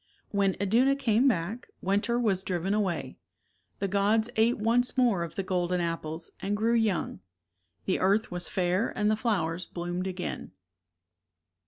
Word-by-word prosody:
When 200 -2 +2
Iduna 235 +8 +3
came 250 -1 +2
back, 220 +1 -1
winter 205 +5 +1
was 200 -6 +1
driven 185 +1 -1
away. 180 -10 -1 0.6
The 195 - -1
gods 210 +4 +2
ate 225 +2 +3
once 240 +4 +1
more 235 -8 +3
of 170 -2 -5
the 195 - -2
golden 180 -1 0
apples 165 -1 -4
and 205 +1 -1
grew 225 +2 +2
young; 225 -5 0 0.7
the 185 - +1
earth 200 +3 +2
was 175 0 -4
fair 185 +3 +1
and 210 0 +2
the - - +3
flowers 180 -6 -1
bloomed 175 +1 -4
again. 180 - -5
200 Hz, 150 wpm, -28 LUFS, 180-225 Hz, 0.7 s, Iduna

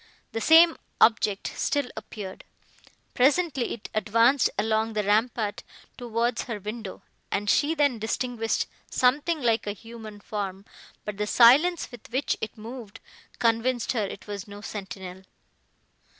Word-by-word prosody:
The 225 - -3
same 325 +3 +7 0.2
object 215 -3 +3
still 285 -2 0
appeared. 210 -3 -8 0.7
Presently, 280 0 +2
it 225 - -10
advanced 230 +5 +3
along 220 +1 +1
the 210 -1 0
rampart, 215 +1 +1 0.3
towards 235 -1 -1
her 230 -4 -4
window, 210 0 -7 0.3
and 205 +1 -1
she 295 +9 +3
then 285 -6 +2
distinguished 225 +1 -1 0.2
something 290 +4 +1
like 225 -2 +1
a 205 - -1
human 220 -1 -11
form, 200 -2 -5 0.4
but 210 -1 -5
the 210 0 -1
silence, 285 +11 +5
with 245 -3 -12
which 260 +4 0
it 220 0 -5
moved, 225 -1 -9 0.4
convinced 235 +1 +1
her 225 -4 0
it 200 0 -6
was 205 -1 -6
no 205 0 -9
sentinel. 190 -3 -7
225 Hz, 135 wpm, -26 LUFS, 210-250 Hz, 0.7 s, same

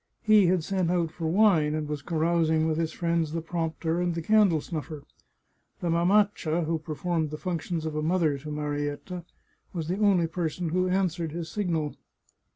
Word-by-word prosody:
He 215 -4 +6
had 180 -2 +2
sent 185 -1 0
out 170 -3 +1
for 165 -1 -4
wine, 165 -5 +4
and 155 -1 -2
was 150 -1 -4
carousing 160 0 +1
with 160 0 0
his 165 -1 0
friends 170 -2 -1
the 165 - -1
prompter 165 0 -2
and 175 -1 0
the 165 - -3
candle 205 -5 +4
snuffer. 155 -1 -6 0.8
The 170 - -1
mamaccia, 175 -1 +2
who 160 +1 -1
performed 160 +1 -2
the 155 - -5
functions 170 -2 -3
of 155 -1 -3
a 155 - 0
mother 160 -3 +1
to 150 +3 -8
Marietta, 150 +4 -4 0.5
was 165 -3 -4
the 185 +3 -1
only 195 -5 +4
person 165 0 -2
who 185 +3 +1
answered 175 -4 0
his 170 -1 -5
signal. 165 -7 -1
165 Hz, 175 wpm, -27 LUFS, 155-180 Hz, 0.8 s, He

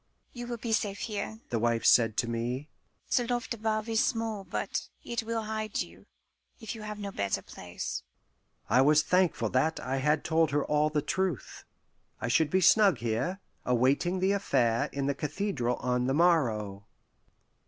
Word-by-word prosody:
"You 240 -1 -6
will 240 -1 -4
be 230 0 -4
safe 205 -2 0
here," 220 +1 -4
the 115 - +1
wife 115 0 +1
said 115 -3 +5
to 120 - +1
me. 120 +5 -3 0.5
"The 245 -2 +2
loft 245 0 -1
above 215 -1 -1
is 225 -1 +2
small, 225 -3 -1
but - - -3
it 235 -1 -2
will 225 0 -3
hide 215 -1 -3
you, 85 +3 -10 0.5
if 220 -3 -5
you 225 - -9
have 210 0 -6
no 200 -1 -5
better 100 - -1
place." 90 -1 -6 0.7
I 130 - +4
was 150 +2 +5
thankful 180 - +2
that 155 +7 +1
I 130 +1 -2
had 150 +3 +1
told 160 -1 +2
her 145 0 0
all 150 0 +2
the 150 -1 -1
truth. 180 -5 -2 0.5
I 125 - -2
should 155 +5 +3
be 190 +5 +2
snug 200 +1 +6
here, 120 - -2 0.2
awaiting 135 +9 +2
the 190 +1 +3
affair 125 - +1
in 140 -1 -2
the 140 - +1
cathedral 145 - -2
on 125 0 -1
the 135 - +1
morrow. 110 - +1
155 Hz, 175 wpm, -29 LUFS, -, 0.7 s, snug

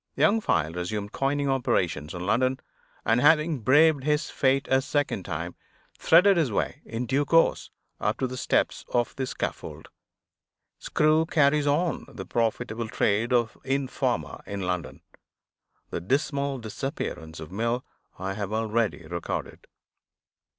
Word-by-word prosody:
Young 220 +2 +3
File 80 - +1
resumed 100 +4 -4
coining 140 +1 0
operations 90 - 0
in 90 0 -5
London; 130 +6 +1 0.5
and, 115 +2 +3
having 155 0 +4
braved 145 +5 +4
his 150 +2 0
fate 135 0 +1
a 130 0 +5
second 140 -9 -1
time, 85 +1 -4 0.5
threaded 180 +3 +6
his 155 -8 +2
way, - - -2
in 115 +2 -4
due 135 +4 +1
course, 165 +3 +3 0.3
up - - 0
to - - -1
the 130 0 -4
steps - - 0
of 120 -1 0
the 130 -1 -2
scaffold. - - -5 0.9
Screw 155 +1 +2
carries 145 -1 +3
on 155 +1 +1
the - - -8
profitable 115 0 -1
trade 110 +3 +1
of 120 -3 +2
informer, 135 0 -1
in 100 -1 -4
London. 90 -7 -3 0.9
The - - -3
dismal 140 - 0
disappearance 110 - -5
of 80 +1 -9
Mill 115 +5 -1 0.3
I 95 +1 -3
have 100 0 -4
already 110 0 0
recorded. - - -5
125 Hz, 135 wpm, -26 LUFS, 100-145 Hz, 0.9 s, threaded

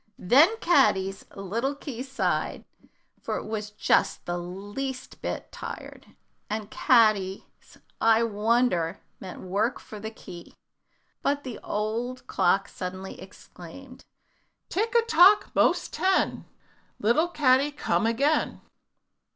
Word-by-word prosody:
Then 300 - +5
Caddy's 195 - +2
little 230 +8 -2
key 280 -4 -7
sighed, 270 0 -2 0.6
for - - -3
it - - -6
was 215 -1 -4
just 210 - +1
the 175 0 -2
least 205 +9 -6
bit - - -5
tired, - - -9 0.4
and 215 0 -4
Caddy's 215 -6 +3 0.6
"I 225 0 +5
wonder" 215 -5 +1 0.2
meant 185 -2 -9
work 200 +7 -1
for 215 - -10
the 220 +2 -5
key. 175 -5 -12 0.7
But 285 0 0
the 250 -4 -7
old 230 +4 -3
clock 195 +3 +1
suddenly 185 +1 -7
exclaimed, 190 +7 -13 0.7
"Tick 445 +6 -1
a 470 - +5
tock, 410 -2 +5
'most - - +2
ten, 375 0 +1 0.5
Little 240 +11 +2
Caddy, 280 -4 +3
come 260 -5 0
again." 280 +7 +1
230 Hz, 115 wpm, -26 LUFS, 195-275 Hz, 0.7 s, Then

